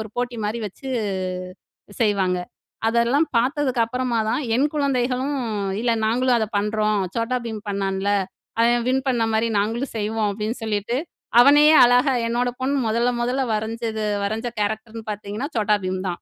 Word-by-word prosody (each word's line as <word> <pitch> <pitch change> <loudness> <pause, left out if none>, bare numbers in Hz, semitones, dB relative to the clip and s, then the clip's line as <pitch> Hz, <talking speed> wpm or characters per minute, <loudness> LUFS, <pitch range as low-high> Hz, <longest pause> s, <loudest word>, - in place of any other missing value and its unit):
ஒரு 220 - -5
போட்டி 245 -1 -2
மாரி 215 +3 -2
வச்சு 235 +7 -9 1.1
செய்வாங்க. 195 -5 +2 0.5
அதெல்லாம் 235 +7 +2
பார்த்ததுக்கு 260 -1 +1
அப்பறமா 250 -1 -1
தான், - - 0 0.2
என் 270 +4 +3
குழந்தைகளும் 265 0 0 0.5
இல்ல,"நாங்களும் 235 +2 +2
அத 220 - 0
பண்றோம். 210 0 0 0.2
Chhota 235 +2 0
Bheem 220 -2 -4
பண்ணான்ல 195 0 -1 0.5
அவன் 240 0 +3
வின் 260 +1 +1
பண்ண 240 -3 +1
மாரி 225 +1 +2
நாங்களும் 230 +6 -2
செய்வோம்." 215 0 0
அப்படின்னு 215 +3 -3
சொல்லிட்டு, 215 +2 -1 0.4
அவனயே 295 +4 +7
அழகா 250 +3 +4 0.2
என்னோட 245 +1 0
பொண்ணு 275 +2 0
முதல்ல, 235 +3 +2
முதல்ல 255 +2 0
வரஞ்சது 220 0 -3 0.2
வரைஞ்ச 220 +4 -2
கேரக்டர்ன்னு 220 +2 -3
பார்த்தீங்கன்னா 210 +6 -5
Chhota 215 -2 +2
Bheem 185 0 -2
தான். 175 - -4
230 Hz, 140 wpm, -22 LUFS, 215-250 Hz, 1.1 s, அவனயே